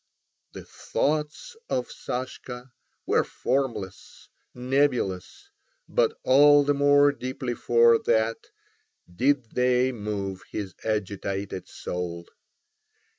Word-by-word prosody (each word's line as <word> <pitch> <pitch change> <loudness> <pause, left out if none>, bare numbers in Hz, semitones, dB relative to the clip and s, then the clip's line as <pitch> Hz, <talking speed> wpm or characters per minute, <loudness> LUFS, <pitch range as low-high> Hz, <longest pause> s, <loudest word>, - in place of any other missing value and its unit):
The - - -9
thoughts 150 - -2
of 125 - -2
Sashka 125 0 -6 0.3
were - - +2
formless, 125 -8 -4 0.2
nebulous, 125 - -1 0.4
but - - +1
all 145 +2 +6
the 145 +1 +2
more 145 0 +5
deeply 130 -2 -4
for 115 -1 +4
that 110 +1 0 0.7
did 130 +1 +1
they 125 +1 +2
move 100 -4 -4
his 100 -3 -5
agitated 100 -2 -3
soul. 85 -1 -5
125 Hz, 90 wpm, -26 LUFS, 105-140 Hz, 0.7 s, all